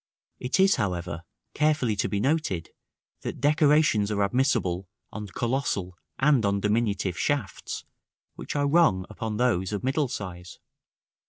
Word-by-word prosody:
§ - - -25
XIV. - - -1
It 130 - 0
is, 195 +1 +5
however, 85 -3 -2 0.3
carefully 150 -7 +2
to - - 0
be 100 - -1
noted, 130 - 0 0.5
that - - -5
decorations 150 -7 +3
are 100 -1 +1
admissible 100 -6 0 0.2
on 105 -1 -6
colossal 110 -5 -2 0.2
and 140 -3 +3
on 100 0 +1
diminutive 105 -3 0
shafts, 140 -10 -2 0.5
which - - -7
are 145 0 +2
wrong 140 - +3
upon 110 0 -4
those 105 -7 +1
of 105 -2 -3
middle 135 +2 +1
size. 90 -7 -7
110 Hz, 145 wpm, -26 LUFS, 95-140 Hz, 0.5 s, is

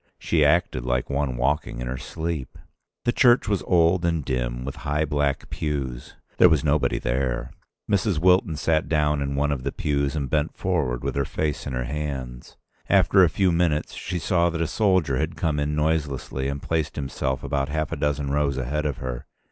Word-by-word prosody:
She 80 -3 +1
acted 75 -4 +2
like 60 +2 -1
one 70 -3 -1
walking 65 -1 0
in 60 - -3
her 65 +1 -4
sleep. 80 -5 -5 0.5
The 120 - +3
church 120 -1 +4
was 100 -3 +1
old 85 0 +3
and 85 -4 0
dim, 60 -2 -2
with 70 +2 -5
high 75 +1 -1
black 75 -1 -1
pews. 70 -5 -4 0.2
There 90 - +7
was 80 -3 +2
nobody 75 -1 +2
there. 65 0 -1 0.4
Mrs. 100 -3 +1
Wilton 90 -1 +3
sat 80 +1 0
down 75 -2 +2
in 70 0 -2
one 75 +1 +1
of 70 -3 -2
the - - -2
pews 70 -1 -1
and 70 -3 -2
bent 75 +4 -1
forward 75 -10 -1
with - - -1
her 70 - 0
face 75 +1 -2
in 70 - -4
her 60 0 -1
hands. 65 -3 -5 0.3
After 95 - +5
a 85 - +5
few 95 +2 +2
minutes 85 -3 +1
she 90 - -4
saw 85 +1 +2
that 85 -1 -4
a 85 - +1
soldier 95 -6 +2
had 80 +4 -2
come 80 -5 -1
in 75 +1 -1
noiselessly 75 -4 -1
and 70 0 -4
placed 80 -2 -1
himself 65 -1 -3
about 70 0 -1
half 75 0 -2
a - - -1
dozen 75 -1 -1
rows 70 -2 +1
ahead 75 +4 -1
of 70 -4 -3
her. 65 -2 -5
75 Hz, 195 wpm, -24 LUFS, 65-80 Hz, 0.5 s, There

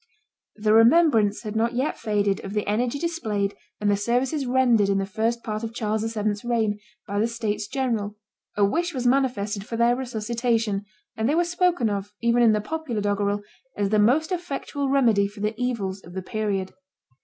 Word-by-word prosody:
The 215 0 +1
remembrance 225 -3 +5
had 215 -1 -5
not 230 +2 +1
yet 260 +5 0
faded 205 -2 0
of 195 - -6
the 210 -1 -1
energy 235 +6 0
displayed 220 -12 -1 0.3
and 210 - -1
the 205 - +4
services 250 +7 0
rendered 245 -5 +3
in 195 - +2
the 195 - 0
first 225 +4 -1
part 215 0 -4
of 225 0 -5
Charles 215 -2 -1
VII.'s 210 -2 -2
reign 225 -4 0 0.3
by 200 0 -2
the 220 - +2
states 215 -3 -3
general; 230 -5 -2 0.4
a 205 - +5
wish 340 +10 -1
was 250 -1 -2
manifested 240 -6 +1
for 230 +2 -5
their 235 +1 +4
resuscitation; 230 -3 -1 0.3
and 225 +2 0
they 300 - +2
were 345 - +3
spoken 350 -6 +1
of, 205 0 -3
even 235 +1 +2
in 230 -2 +6
the 210 - +1
popular 295 -2 -3
doggerel, 205 0 0 0.3
as 200 -1 +1
the 215 +1 +3
most 275 - +3
effectual 285 -5 -3
remedy 230 -7 +3
for 205 +1 -11
the 210 +1 0
evils 200 -6 -2
of 175 - -12
the 190 0 -4
period. 200 -2 -2
220 Hz, 190 wpm, -24 LUFS, 205-250 Hz, 0.4 s, in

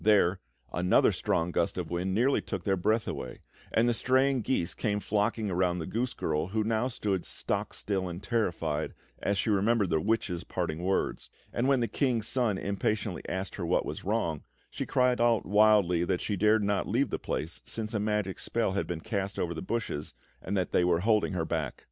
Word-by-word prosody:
There, 100 -4 +4 0.3
another 90 +2 +4
strong 85 +1 0
gust 85 +1 0
of 85 -3 -4
wind 90 +2 -1
nearly 125 +6 +3
took - - -5
their 95 -2 +2
breath 110 +5 +1
away, 65 - -5 0.3
and 115 +1 +3
the 120 - +3
straying 130 +2 +2
geese 105 -8 0
came 105 -2 -1
flocking 105 0 0
around 90 0 +1
the 80 - -3
goose 120 +7 -2
girl, 75 +1 -1
who 110 +3 0
now 110 +2 +1
stood 100 -7 -2
stock - - -2
still 95 -3 -2
and 85 +3 -7
terrified, 85 -8 -1 0.3
as 100 - 0
she 105 - +1
remembered 100 -1 +2
the 80 -1 +2
witch's 100 -5 0
parting 80 +2 -3
words; 95 +2 -1 0.2
and 120 +2 +1
when 135 -2 +3
the 115 - +1
King's 120 -6 0
Son 120 -7 +1
impatiently 100 0 -1
asked 95 0 -4
her 90 - -3
what 90 - +2
was - - -5
wrong, 95 -7 -1 0.3
she - - -4
cried 125 -1 +2
out 120 -3 +3
wildly 105 -4 +4
that 90 0 0
she 105 - -1
dared 105 +2 +3
not 100 0 0
leave 125 +6 +1
the - - -2
place, 80 +2 -3
since 110 0 -4
a 105 - 0
magic 105 -2 -1
spell 115 -4 0
had 100 - -1
been 85 -2 -4
cast 100 0 -3
over 85 -1 -1
the 80 - -5
bushes 95 -8 -3 0.3
and 100 +2 -2
that 90 - -1
they - - +3
were 85 -1 +2
holding 105 -1 +2
her 85 -3 -1
back. - - -2
100 Hz, 205 wpm, -29 LUFS, 90-115 Hz, 0.3 s, There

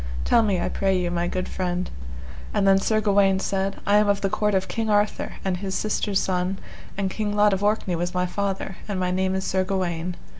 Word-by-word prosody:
tell 235 - +5
me, 200 -5 +1
I - - -1
pray 195 -1 +1
you, 175 -1 -1
my 175 0 0
good 185 +1 -2
friend. 180 -1 -2 0.7
And 195 - +2
then 195 0 +6
Sir 215 +2 +1
Gawaine 200 -2 +3
said, 195 0 -1
I 205 +1 +4
am 210 0 +4
of 200 0 +2
the 195 -2 0
court 210 -1 +1
of 190 0 0
King 225 -1 -2
Arthur, 205 0 +1
and 185 -2 0
his 190 0 -4
sister's 205 0 0
son, 185 +1 -1 0.4
and 195 -1 -1
King 210 0 -2
Lot 210 0 +4
of 195 +1 -1
Orkney 205 -3 +1
was 175 +1 -2
my 180 0 +1
father, 195 0 -3
and 200 -3 -2
my 180 0 0
name 190 +1 0
is 190 - -2
Sir 190 0 +1
Gawaine. 180 -2 -2
195 Hz, 225 wpm, -24 LUFS, 185-205 Hz, 0.7 s, then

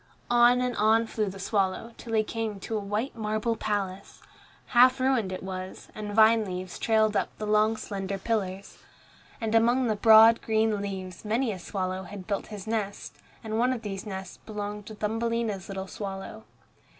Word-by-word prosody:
On 240 +1 +5
and 250 -1 -1
on 220 +2 +4
flew 215 -2 -2
the 195 - -9
swallow, 195 +3 -1
till 230 - -8
he 215 -1 +3
came 220 -2 -4
to 225 - -4
a - - +1
white 210 +6 -3
marble 215 +1 -1
palace. 200 -3 -3 0.5
Half 255 +2 +6
ruined 255 -7 +1
it 185 - -5
was, 185 0 -7
and 210 -1 -6
vine 220 0 +6
leaves 185 -2 -6
trailed 220 -1 +2
up - - +1
the 215 - -4
long 215 +1 +3
slender 195 -2 -4
pillars. 195 -2 -3 0.6
And 225 -1 -2
among 240 +3 +4
the 220 -2 +1
broad, 225 +2 +7
green 220 -2 +1
leaves 190 -3 -6
many 225 +3 0
a 190 - -6
swallow 185 0 -3
had 200 -2 -9
built 200 0 -2
his 210 -3 -8
nest, 215 -3 -3 0.3
and 220 0 -2
one 250 +2 +3
of 240 -3 -3
these 195 0 -5
nests 190 -2 -6
belonged 210 -1 -6
to 215 - -8
Thumbelina's 225 -2 -2
little 190 -1 -4
swallow. 195 +2 -7
215 Hz, 175 wpm, -27 LUFS, 195-225 Hz, 0.6 s, broad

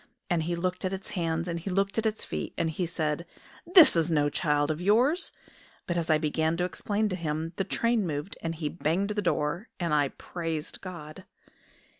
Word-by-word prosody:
And 170 -2 +3
he 170 +2 -1
looked 180 +2 -2
at 185 0 -1
its 190 0 -6
hands 165 -1 -1
and 170 -1 -2
he 175 - -5
looked 195 +3 +1
at 225 - +1
its 215 0 -3
feet, - - -4
and 160 - 0
he 175 +2 -2
said: 160 -1 -1 0.5
'This 350 - +9
is 165 0 +2
no 145 -3 +2
child 150 -1 +1
of 155 +2 -4
yours!' 245 - +3 0.5
But 175 - -2
as 170 -1 -1
I 155 - +5
began 160 +1 0
to 180 - 0
explain 205 +4 -1
to 185 - -1
him, 160 -1 -3
the 195 - +1
train 230 0 +1
moved, 150 +4 -4
and 165 0 -2
he 155 -1 -2
banged 175 +6 0
the 210 0 0
door; 170 +2 -1
and 170 -3 0
I 145 -2 +4
praised 165 +1 -5
God!" 175 -1 -8
170 Hz, 205 wpm, -28 LUFS, 155-195 Hz, 0.5 s, This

